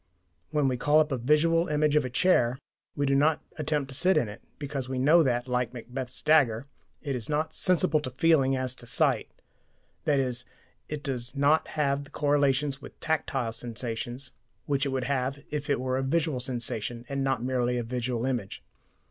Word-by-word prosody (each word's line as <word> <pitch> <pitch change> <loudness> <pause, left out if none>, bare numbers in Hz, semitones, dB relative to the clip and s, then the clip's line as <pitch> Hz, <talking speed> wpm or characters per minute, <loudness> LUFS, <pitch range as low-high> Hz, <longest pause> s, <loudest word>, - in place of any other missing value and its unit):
When 150 -3 +1
we 130 -1 0
call 145 +4 +4
up 155 -1 +2
a 135 - 0
visual 165 +6 +3
image 150 0 +2
of 150 - +4
a 130 - -3
chair, 125 -3 +3 0.4
we 145 - 0
do 140 - +2
not 150 +3 +3 0.2
attempt 150 -2 -1
to 135 - -7
sit 185 +7 +3
in 120 - +2
it, 105 +2 -9 0.2
because 140 -3 -4
we 130 - -2
know 150 +7 +5
that, 120 -4 +1
like 125 -1 -1
Macbeth's 125 +2 -6
dagger, 140 -6 +4 0.4
it 140 -3 -2
is 120 +1 -5
not 155 +1 0
"sensible 160 -4 +2
to 145 -3 -5
feeling 135 -1 +3
as 130 -1 -1
to 120 -1 -12
sight" - - +1 0.8
i.e. 135 -4 +2 0.6
it 150 -1 -5
does 125 -2 -2
not 145 +3 +3
have 140 -1 +1
the - - -15
correlations 145 -1 +1
with - - -12
tactile 135 -7 -1
sensations 120 +2 -5 0.3
which 140 -1 0
it - - -1
would 130 -1 -1
have 135 0 -1
if 150 -1 -3
it 140 - +2
were 130 0 -1
a - - 0
visual 150 0 0
sensation 120 -2 -3
and 140 0 -2
not 135 -3 0
merely 125 -1 0
a 120 - -1
visual 120 0 -2
image. 120 -7 -3
135 Hz, 190 wpm, -28 LUFS, 125-150 Hz, 0.8 s, know